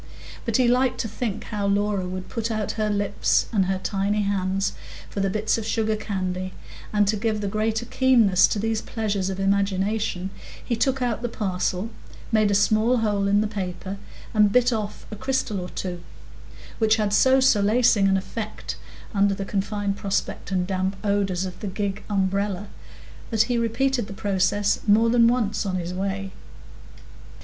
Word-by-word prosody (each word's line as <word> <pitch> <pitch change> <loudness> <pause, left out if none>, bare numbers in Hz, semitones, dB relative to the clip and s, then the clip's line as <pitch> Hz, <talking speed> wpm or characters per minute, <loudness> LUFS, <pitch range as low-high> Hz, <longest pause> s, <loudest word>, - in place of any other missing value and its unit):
But 230 -3 +1
he 255 -2 +3
liked 255 +1 +2
to 225 - -3
think 220 -1 -4
how 205 -2 -3
Laura 200 -1 +1
would 185 0 -5
put 230 -1 -3
out 215 -2 -1
her 215 -1 -1
lips 205 -1 +1
and 195 -4 +2
her 190 0 0
tiny 200 +2 0
hands 195 -1 0 0.4
for - - -4
the 195 0 +1
bits 215 +3 0
of - - -4
sugarcandy; 200 -4 -2 0.4
and 205 -1 +3
to 215 - +2
give 215 0 -1
the 205 - -2
greater 220 +3 -1
keenness 245 -7 +4
to - - -2
these 220 +1 0
pleasures 205 -4 -2
of 190 0 -4
imagination, 195 0 0 0.3
he 235 - 0
took 265 +3 +1
out 235 -2 -1
the 240 - -2
parcel, 190 -1 -2 0.4
made 215 -2 +3
a 200 - +2
small 215 +4 +3
hole 205 -3 +1
in 200 +1 +3
the - - +1
paper, 190 -1 -5 0.3
and 210 -2 +4
bit 250 +2 +4
off 210 -2 -4
a - - -4
crystal 255 -3 -1
or 180 - -6
two, 175 -2 -5 0.8
which 220 -1 +4
had 210 -2 0
so 260 +5 +5
solacing 230 -3 +4
an 195 0 +3
effect 215 +3 -5 0.4
under 200 -1 +3
the 195 0 -4
confined 200 0 -2
prospect 200 -1 -2
and 185 -1 +1
damp 190 +1 -1
odors 195 -3 0
of 185 -1 -7
the 210 - -5
gig 200 +1 -3
umbrella, 200 0 -1 0.6
that 220 -2 +3
he 245 +2 -1
repeated 240 0 0
the 205 - -7
process 200 0 +1
more 225 +3 +5
than 235 -1 +5
once 235 -4 +1
on 190 -3 -2
his 180 0 -3
way. 195 +1 -3
205 Hz, 175 wpm, -24 LUFS, 195-225 Hz, 0.8 s, so